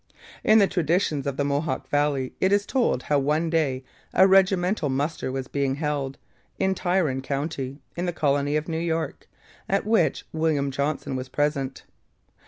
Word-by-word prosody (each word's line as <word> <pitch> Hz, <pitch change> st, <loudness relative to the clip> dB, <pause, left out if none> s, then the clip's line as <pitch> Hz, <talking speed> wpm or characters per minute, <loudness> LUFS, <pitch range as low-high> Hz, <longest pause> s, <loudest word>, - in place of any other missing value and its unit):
In 215 Hz, -, +6 dB
the 205 Hz, -, +6 dB
traditions 165 Hz, -5 st, 0 dB
of 135 Hz, -1 st, -2 dB
the 145 Hz, -, +1 dB
Mohawk 140 Hz, -1 st, -1 dB
valley 145 Hz, -3 st, 0 dB
it 190 Hz, -, +3 dB
is 205 Hz, 0 st, +3 dB
told 240 Hz, -, +1 dB
how 145 Hz, -1 st, +2 dB
one 155 Hz, +4 st, 0 dB
day 140 Hz, -6 st, 0 dB, 0.3 s
a 190 Hz, -, +7 dB
regimental 190 Hz, -3 st, +3 dB
muster 140 Hz, +1 st, -2 dB
was 130 Hz, -1 st, -4 dB
being 140 Hz, -1 st, -1 dB
held, 145 Hz, -2 st, -2 dB, 0.4 s
in 190 Hz, 0 st, +1 dB
Tryon 175 Hz, -8 st, 0 dB
county, 140 Hz, -1 st, -3 dB, 0.2 s
in 175 Hz, +1 st, -2 dB
the -, -, +1 dB
colony 145 Hz, -2 st, +1 dB
of 155 Hz, 0 st, -1 dB
New 165 Hz, -1 st, -2 dB
York, 165 Hz, -1 st, -2 dB, 0.4 s
at 195 Hz, +1 st, +1 dB
which 220 Hz, +1 st, +2 dB
William 155 Hz, -3 st, +1 dB
Johnson 140 Hz, 0 st, -2 dB
was 130 Hz, 0 st, -5 dB
present. 140 Hz, -1 st, -1 dB
150 Hz, 165 wpm, -25 LUFS, 140-175 Hz, 0.4 s, a